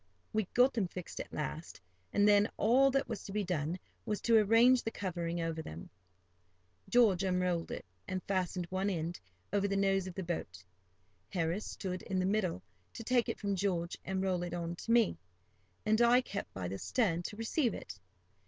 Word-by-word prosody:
We 220 -1 +1
got 250 +2 +5
them 215 -6 0
fixed 180 0 -7
at - - -6
last, 155 -2 -5 0.3
and 205 0 +4
then 205 +1 +5
all 260 +5 +5
that 275 0 +1
was - - -4
to 200 - -8
be 210 +1 0
done 170 -2 -1 0.3
was 210 -1 -2
to 230 - +4
arrange 230 +4 +6
the - - -2
covering 175 -5 -3
over 165 -1 -2
them. 80 - -9 1.0
George 220 -7 +5
unrolled 180 -2 0
it, - - -6 0.2
and 185 -1 -3
fastened 185 -2 -1
one 190 +2 0
end 170 -2 -3 0.3
over 200 0 +2
the 195 0 0
nose 195 -1 +2
of 180 - -7
the 190 - -3
boat. 95 - -4 0.7
Harris 175 +2 -1
stood 185 -2 -4
in 190 - -3
the 185 - +1
middle 190 -2 0 0.3
to 230 - -7
take 245 0 +2
it - - -3
from 200 -1 -1
George 175 -3 -1
and 190 0 -2
roll 185 -2 0
it 175 0 -3
on 170 0 -3
to 230 - -4
me, 230 - +4 0.7
and 220 +2 +3
I 240 +1 +6
kept 200 -5 -5
by 95 -2 -4
the 95 +2 -5
stern 190 -9 +1
to 205 +4 -6
receive 230 - 0
it. 90 0 -8
190 Hz, 190 wpm, -33 LUFS, 175-215 Hz, 1.0 s, arrange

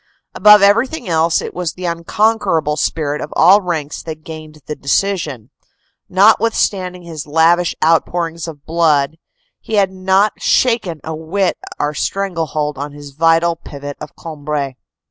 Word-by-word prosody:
Above 210 +1 +7
everything 230 +6 +2
else 165 -1 +1
it - - -6
was 175 -3 -3
the 185 - -7
unconquer 175 +3 +1
able 150 -1 -1
spirit 150 -1 -1
of - - -6
all 190 +6 +6
ranks 160 -5 -3
that 155 -1 -8
gained 155 -1 -10
the 150 - -5
decision. 145 - -1 0.6
Notwith 220 +4 +4
standing 180 -2 -1
his 160 -4 -8
lavish 165 +3 +3
outpourings 165 0 0
of 150 -3 -10
blood, 160 -2 +1 0.4
he 220 - -4
had 195 -2 +3
not 190 +2 +1
shaken 215 - +1
a 160 - -5
whit 175 +4 -1 0.2
our 145 +1 -1
strangle 175 +1 -2
hold 150 -3 -3
on 145 +1 -5
his 145 -1 -11
vital 165 +3 +2
pivot 145 -3 -8
of 150 - -9
Cambrai. 150 -3 -4
165 Hz, 150 wpm, -17 LUFS, 150-185 Hz, 0.6 s, Above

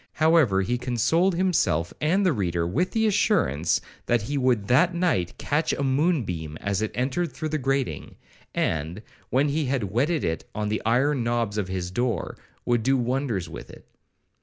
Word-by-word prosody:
However, 155 -12 +3
he 120 +5 -1
consoled 135 - +1
himself 170 - +1
and 180 +7 +2
the 180 - +3
reader 85 -6 -1
with 145 - 0
the 225 -1 +1
assurance, 195 - +2 0.3
that 120 -3 +2
he 145 +7 -3
would 125 -6 +1
that 160 +9 +3
night 160 - 0
catch 150 +3 0
a 140 - -2
moon 145 +3 +2
beam 80 -5 -5
as 100 0 -1
it 110 - 0
entered 135 +7 -1
through 155 +5 -4
the 155 0 -1
grating, 135 0 -2 0.4
and, 80 +6 -1 0.3
when 140 +3 +2
he 150 +1 0
had 125 -8 -1
whetted 145 +7 +1
it 80 0 -2
on 105 -1 -2
the 110 - -1
iron 130 +3 +2
knobs 115 -3 -1
of 100 - -2
his 90 -1 -4
door, 115 -2 -2 0.3
would 120 -1 +2
do 135 +4 +2
wonders 125 -7 -1
with - - -9
it. - - -14
125 Hz, 180 wpm, -25 LUFS, 100-150 Hz, 0.4 s, However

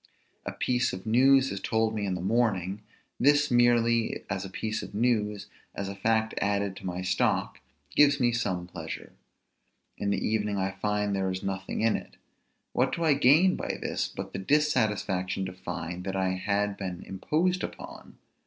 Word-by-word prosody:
A - - -1
piece 125 0 0
of 95 0 -7
news 135 +4 +4
is 100 - -3
told 110 +2 0
me 105 -2 -2
in 95 - -1
the 90 - -4
morning; 100 -2 0 0.4
this, 145 +1 +4
merely 120 -1 +3
as 95 - -2
a 95 - -6
piece 110 +3 -3
of - - -9
news, 105 -3 +1 0.3
as 100 - -3
a 100 - -6
fact 110 +2 +1
added 100 -1 0
to 95 - -7
my 90 0 -3
stock, 90 0 0 0.4
gives 145 -1 +5
me 120 -1 +3
some 95 -7 -1
pleasure. 90 - -8 0.9
In 100 - -1
the 100 - +1
evening 105 -2 0
I 95 0 0
find 105 +1 -1
there 95 -1 0
was 95 0 -4
nothing 95 -1 -3
in 115 0 +3
it. - - -7 0.6
What - - +1
do 170 - -3
I 155 -3 +5
gain 150 +7 +5
by - - -3
this, - - -2
but - - -7
the 95 - -3
dissatisfaction 105 -8 +1
to 90 - -6
find 90 -1 -5
that 95 -1 -3
I 95 -1 +1
had 100 +2 -1
been 90 -3 -5
imposed 165 - 0
upon? - - -8
105 Hz, 180 wpm, -28 LUFS, 95-120 Hz, 0.9 s, gives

